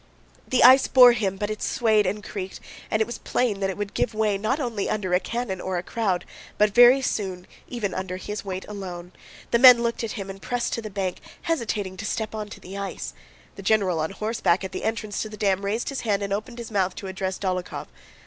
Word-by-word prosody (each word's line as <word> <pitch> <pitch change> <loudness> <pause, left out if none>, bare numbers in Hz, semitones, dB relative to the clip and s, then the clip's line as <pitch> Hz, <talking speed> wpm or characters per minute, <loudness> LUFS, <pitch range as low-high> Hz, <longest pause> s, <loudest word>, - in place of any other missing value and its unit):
The 255 - +3
ice 260 +2 +8
bore 250 -2 +8
him 205 -5 -1
but 205 +1 -2
it 215 - -5
swayed 215 -4 +2
and 205 +2 -2
creaked, 190 -2 -6 0.3
and 215 0 +2
it - - -6
was 240 - -7
plain 225 -6 0
that 195 -1 0
it 190 - -4
would 205 -1 -4
give 220 - -1
way 215 -2 +1
not 220 +9 -1
only 235 -7 -2
under 190 -4 -1
a 180 - +5
cannon 230 -4 -4
or 185 -1 -2
a 175 - -3
crowd, 190 -6 -1 0.3
but 210 -1 +3
very 245 +3 +7
soon 185 -6 -2 0.2
even 215 -6 -3
under 185 -1 -4
his 210 +2 -5
weight 190 -1 -5
alone. 180 -4 -7 0.4
The 235 - +4
men 250 -2 +9
looked 235 0 -1
at 225 - -3
him 195 -3 -5
and 195 0 -9
pressed 245 -1 -2
to 230 - -2
the 215 - -6
bank, 190 -2 -3 0.2
hesitating 210 - -2
to - - -6
step 220 -1 -3
onto 215 -1 -6
the 195 +2 -8
ice. 180 - -5 0.4
The - - -7
general 190 -4 +2
on 155 +1 -1
horseback 215 -3 0
at 190 - -5
the - - -5
entrance 220 -2 -2
to 215 - -4
the 215 - -9
dam 195 -1 +1
raised 210 +4 -1
his 275 - -4
hand 205 -3 0
and 200 0 -2
opened 220 +4 -4
his 235 -1 -7
mouth 190 -3 0
to - - -7
address 190 0 -3
Dólokhov. 185 -2 -3
205 Hz, 230 wpm, -25 LUFS, 190-230 Hz, 0.4 s, men